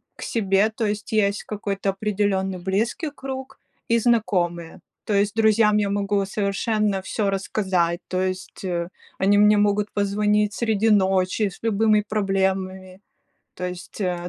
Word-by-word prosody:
к - - -13
себе. 200 -1 +1
То 225 - -1
есть 210 +1 -3
есть 200 -2 +1
какой-то 200 -2 -3
определенный 195 -1 -1
близкий 220 - -1
круг 265 -2 -7 0.3
и 230 - +3
знакомые. 180 -8 0 0.3
То 215 - -1
есть 200 +1 +1
друзьям 220 -1 +4
я 205 -1 +1
могу 200 0 0
совершенно 205 0 -1
всё 200 +2 -1
рассказать, 190 -3 0
то 185 0 -1
есть, 185 +1 -4
э, 175 -1 -2 0.3
они 200 +1 +4
мне 210 0 +5
могут 205 0 +1
позвонить 210 +1 +1
среди 220 -1 +1
ночи 190 0 +2
с - - -14
любыми 215 -1 +3
проблемами. 190 -2 -1 0.6
То 180 - -6
есть, 180 +3 -7
э, 175 -2 -2
200 Hz, 145 wpm, -23 LUFS, 190-210 Hz, 0.6 s, мне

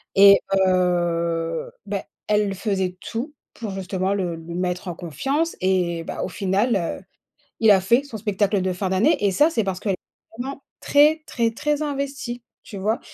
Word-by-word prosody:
et 200 0 +9 0.3
heu, 170 -2 0 0.2
bah 200 -1 -2 0.2
elle 210 -1 +2
faisait 190 -3 -1
tout 255 +6 -5 0.2
pour, 220 -3 -5
justement, 190 0 -2
le 180 -4 -1
le 165 +1 -9
mettre 180 +1 -2
en - - -3
confiance 270 - -2
et 180 -3 +1
bah - - -5
au - - -3
final, 200 +6 +1 0.2
heu, - - -18 0.6
il 220 - +6
a 190 - +5
fait 235 +8 +3
son 280 -6 -8
spectacle 200 -1 0
de 185 -1 0
fin 185 +1 -2
d'année 205 - +2
et 200 - +4
ça 295 - +5
c'est 225 -9 0
parce 190 -2 -2
qu'elle 200 - 0
est - - -8 0.4
vraiment 275 +2 -5 0.2
très, 305 +2 +4
très, 230 -2 0
très 295 +5 -1
investie, 275 -4 -3 0.2
tu 205 - -9
vois? 215 +4 0
200 Hz, 180 wpm, -23 LUFS, 180-240 Hz, 0.6 s, et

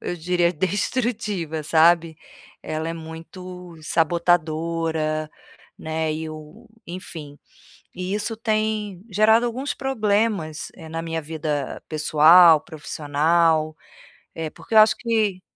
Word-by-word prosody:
eu 175 - -4
diria 175 +1 +1
destrutiva, 195 -2 -2
sabe. 165 +1 +3 0.5
Ela 155 +1 -3
é - - -3
muito 170 +2 -10
sabotadora, 160 -1 0 0.5
né, 160 0 -2
e 160 +1 -4
o 155 +10 -12 0.2
enfim, 160 -5 -8 0.6
e 185 +2 -4
isso 215 +2 -2
tem 215 -4 -2
gerado 220 +4 +4
alguns 260 +5 -3
problemas, 210 - -1
eh, 160 -3 -11
na 165 +1 -4
minha 165 0 -3
vida 150 -3 -4
pessoal, 155 +1 +6
profissional. 155 +1 0 0.6
Eh, 160 -1 -4
porque 225 - -8
eu - - +8
acho 215 0 +6
que 220 -5 0
165 Hz, 110 wpm, -23 LUFS, 155-205 Hz, 0.6 s, eu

